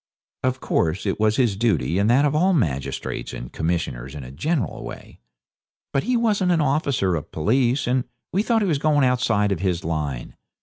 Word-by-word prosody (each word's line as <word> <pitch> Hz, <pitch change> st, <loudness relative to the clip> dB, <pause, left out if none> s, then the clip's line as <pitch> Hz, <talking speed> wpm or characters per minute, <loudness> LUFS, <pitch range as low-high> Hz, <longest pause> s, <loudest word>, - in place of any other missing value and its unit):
Of 130 Hz, 0 st, 0 dB
course, 85 Hz, +4 st, 0 dB
it 95 Hz, -, -1 dB
was 110 Hz, 0 st, +3 dB
his 120 Hz, -6 st, +2 dB
duty 100 Hz, -4 st, +1 dB
and 100 Hz, +2 st, +2 dB
that 135 Hz, +5 st, +5 dB
of 145 Hz, -, +1 dB
all 180 Hz, +5 st, +3 dB
magistrates 70 Hz, -, -2 dB
and -, -, -7 dB
commissioners 75 Hz, -6 st, -2 dB
in 70 Hz, -, -6 dB
a 60 Hz, -, -9 dB
general 130 Hz, -, -2 dB
way. -, -, -10 dB, 0.7 s
But 135 Hz, -, +1 dB
he 250 Hz, -1 st, +2 dB
wasn't 205 Hz, -6 st, +2 dB
an 170 Hz, -, +3 dB
officer 140 Hz, -, +1 dB
of 80 Hz, -, -4 dB
police, 120 Hz, -, +1 dB
and 125 Hz, 0 st, +1 dB, 0.3 s
we 195 Hz, -, +3 dB
thought 225 Hz, 0 st, +2 dB
he -, -, +1 dB
was 155 Hz, -6 st, +1 dB
going 145 Hz, -2 st, +3 dB
outside 115 Hz, -5 st, +2 dB
of 95 Hz, -, -1 dB
his 90 Hz, -2 st, -1 dB
line. 75 Hz, -7 st, -3 dB
120 Hz, 190 wpm, -23 LUFS, -, 0.7 s, that